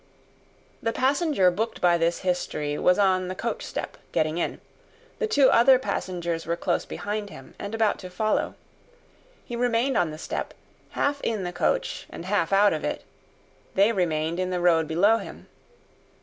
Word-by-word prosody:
The 225 - 0
passenger 275 - +2
booked 220 +6 -3
by 175 -1 +4
this 170 +1 0
history, 155 -5 -1
was 180 - +4
on 185 -2 +2
the 185 - -4
coach - - -3
step, - - -5
getting 155 +2 0
in; - - -2 0.6
the 450 - 0
two 285 -11 +4
other 255 +3 +6
passengers 175 -9 -3
were 170 - 0
close 175 0 -1
behind 205 0 -4
him, 135 -9 -12
and 200 +2 -5
about 220 -2 +1
to 185 - -8
follow. 215 +4 -1 0.9
He 240 - -6
remained 245 +1 +1
on 170 - +2
the 155 - -7
step, - - -5 0.4
half 285 0 0
in 215 -4 -1
the 175 0 -4
coach - - -1
and 170 - -8
half 185 -3 0
out 200 0 +5
of; 155 - -3 0.9
they 200 +4 +5
remained 165 -4 -1
in 185 0 -1
the 180 -1 -1
road 165 -2 +3
below 200 +8 +4
him. - - -9
185 Hz, 165 wpm, -25 LUFS, 170-225 Hz, 0.9 s, other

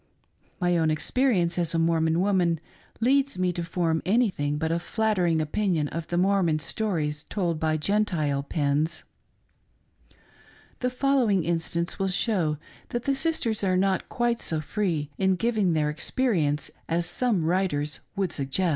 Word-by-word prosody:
My 175 -1 +2
own 160 -1 +2
experience 175 - +1
as 170 -1 0
a - - +3
Mormon 165 0 +2
woman 180 -4 +2 0.4
leads 275 0 +2
me 180 -1 +1
to 175 - -3
form 165 -1 0
any 220 +4 +3
thing 145 -3 -2
but 160 +1 -1
a 170 - +1
flattering 185 -5 +1
opinion 155 -1 0
of 165 0 -5
the 175 - -2
Mormon 185 -4 +3
stories 155 -2 -2
told 175 -6 -1
by 155 0 +1
Gentile 155 -6 0
pens. 145 +2 -1 1.8
The 250 - 0
following 250 -7 +2
instance 170 +1 -2
will 195 - +1
show 180 -5 0 0.3
that 240 0 -3
the 275 - +1
sis 320 +4 +1
ters 220 -3 -1
are 185 -1 +2
not 190 0 +1
quite 240 -1 0
so 160 - -2
free 155 -4 -2
in 190 -1 +3
giving 215 -4 +1
their 150 -1 +1
experience 155 - 0 0.2
as 170 +1 +1
some 180 0 0
writers 160 -4 0 0.2
would 195 -4 -1
suggest. 140 +6 0
175 Hz, 155 wpm, -26 LUFS, 160-205 Hz, 1.8 s, a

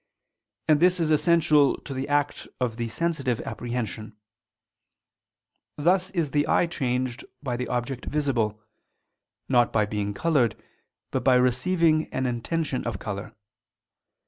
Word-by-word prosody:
And 155 -2 +5
this 180 +2 +4
is 160 -2 +1
essential 155 -3 +4
to 140 - -7
the 130 +1 -3
act 145 0 0
of 120 -3 -1
the 120 -1 -2
sensitive 140 -1 -1
apprehension: 115 -3 -5 1.6
thus 180 +5 +2
is 165 -7 -1
the 145 +1 +1
eye - - +3
changed 130 -6 -2 0.2
by 125 -4 -2
the 125 +1 -3
object 125 +1 -3
visible, 120 -8 0 0.9
not 120 -2 +3
by 110 -2 +2
being 105 -1 -3
colored, 140 -8 +2 0.6
but - - -1
by 130 - +5
receiving 155 +6 +2
an 130 - -1
intention 130 +4 -2
of 115 -5 -2
color. 100 0 -6
130 Hz, 130 wpm, -26 LUFS, 120-155 Hz, 1.6 s, And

